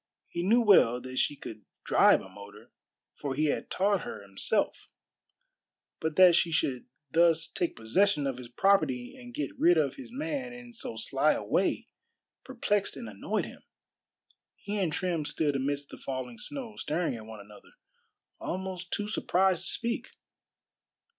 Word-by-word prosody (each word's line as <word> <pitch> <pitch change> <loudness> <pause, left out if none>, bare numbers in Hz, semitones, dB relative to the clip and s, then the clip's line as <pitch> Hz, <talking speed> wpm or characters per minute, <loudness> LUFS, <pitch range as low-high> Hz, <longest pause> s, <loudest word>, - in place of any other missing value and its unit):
He 170 - -4
knew 220 +7 +4
well 175 - +5
that 130 +1 -4
she 145 - +1
could 110 -6 -9 0.2
drive - - +5
a - - -11
motor, 100 +3 -13 0.4
for 140 -2 -4
he 155 +3 +1
had - - -6
taught 195 0 +1
her - - -7
himself; 100 -1 0 1.1
but 160 -1 -2
that 185 -2 +8
she 170 0 +3
should 130 -5 0 0.2
thus 165 0 +4
take 170 +2 -2
possession 150 - +2
of 135 -2 -2
his 125 - -8
property 130 -4 +1
and 245 -1 -11
get 145 - -3
rid 175 0 +5
of 145 -3 +1
his 270 - -9
man 275 -2 -4
in 245 0 -11
so 230 - -6
sly - - +2
a - - -4
way - - 0 0.6
perplexed 210 -6 -1
and - - -7
annoyed 100 -2 -2
him. - - -12 0.9
He 205 +1 -4
and 180 -5 +1
Trim 170 -1 -1
stood 145 -1 0
amidst 140 +1 -2
the - - -10
falling 130 -3 -5
snow, 260 -7 -6
staring 175 0 -1
at 110 -1 -10
one 110 -1 -9
another, 105 +1 -15 0.7
almost 185 0 -5
too 205 - -1
surprised 190 -3 +1
to - - +2
speak. 235 +2 0
165 Hz, 160 wpm, -29 LUFS, 130-200 Hz, 1.1 s, that